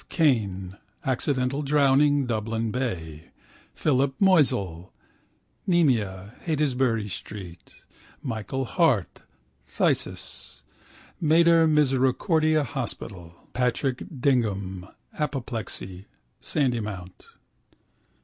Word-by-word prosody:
Kane 100 - +1 0.3
(accidental 130 +1 0
drowning, 145 0 +3
Dublin 115 -1 -2
Bay), 85 - -4 0.5
Philip 135 -2 +1
Moisel 125 - +2 0.8
(pyemia, 110 - +1
Heytesbury 130 -8 0
street), 90 -2 -8 0.5
Michael 130 +2 -3
Hart 135 - +1 0.5
(phthisis, - - -2 0.6
Mater 165 +1 +5
Misericordiae 150 +2 +2
hospital), 100 -9 -5 0.2
Patrick 125 +1 0 0.2
Dignam 100 -8 0 0.3
(apoplexy, 115 -9 -4 0.3
Sandymount). 105 - -2
125 Hz, 65 wpm, -26 LUFS, 100-145 Hz, 0.8 s, Mater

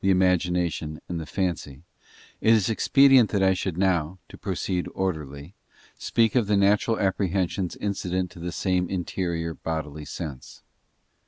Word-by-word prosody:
imagination 90 -4 +1
and 85 -1 -3
the 80 - -7
fancy, 85 -7 -3 0.6
it 110 - +4
is 110 -1 +3
expedient 135 0 +5
that 100 -2 +1
I 95 0 +4
should 90 -2 -3
now 90 -2 +1
—to - - -12
proceed 90 -2 -2
orderly—speak 85 - -3
of 120 -5 +2
the 105 -1 +3
natural 105 +3 +2
apprehensions 95 -2 0
incident 95 -3 -2
to - - -13
the 85 +1 -4
same 90 -1 0
interior 85 -2 -2
bodily 75 -2 -5
sense. 70 -3 -8
90 Hz, 135 wpm, -25 LUFS, 80-100 Hz, 0.6 s, expedient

